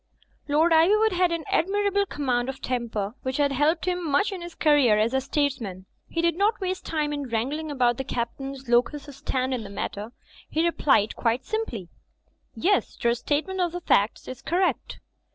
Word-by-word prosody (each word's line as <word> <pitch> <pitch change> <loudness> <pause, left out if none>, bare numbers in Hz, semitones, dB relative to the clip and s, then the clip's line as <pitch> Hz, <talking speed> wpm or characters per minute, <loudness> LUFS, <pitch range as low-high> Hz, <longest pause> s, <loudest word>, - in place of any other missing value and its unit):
Lord 310 +4 +3
Ivywood 420 +7 +5
had 360 -1 +2
an 335 -1 -2
admirable 405 +2 +1
command 255 -5 -1
of 265 - -6
tem 245 -2 -2
per, 205 -1 -3
which 260 0 -3
had 285 -1 +2
helped 300 +6 +1
him 360 -1 -1
much 325 +7 +1
in 380 -3 -6
his 345 -1 -8
career 285 -8 +4
as 220 +3 +1
a 265 - +2
statesman. 255 -10 -2 0.2
He 335 - -2
did 340 -1 +2
not 415 +5 +1
waste 370 -1 -3
time 300 -2 -1
in 285 -3 -4
wrangling 275 +8 -2
about 245 -4 +2
the 265 - -2
Captain's 265 +2 -4
locus 245 +5 +2
standi 260 -1 -2
in 230 - -6
the 200 - -8
matter. 205 +2 -5 0.4
He 320 +2 +1
replied 275 -10 +2
quite 235 +2 0
simply, 255 - -3 0.7
"Yes, 400 +3 +1
Your 235 0 +4
statement 305 +9 -1
of 350 -2 0
the 355 - -4
facts 205 -8 +1
is 255 - -7
correct." 360 +3 -1
290 Hz, 185 wpm, -25 LUFS, 245-345 Hz, 0.7 s, Ivywood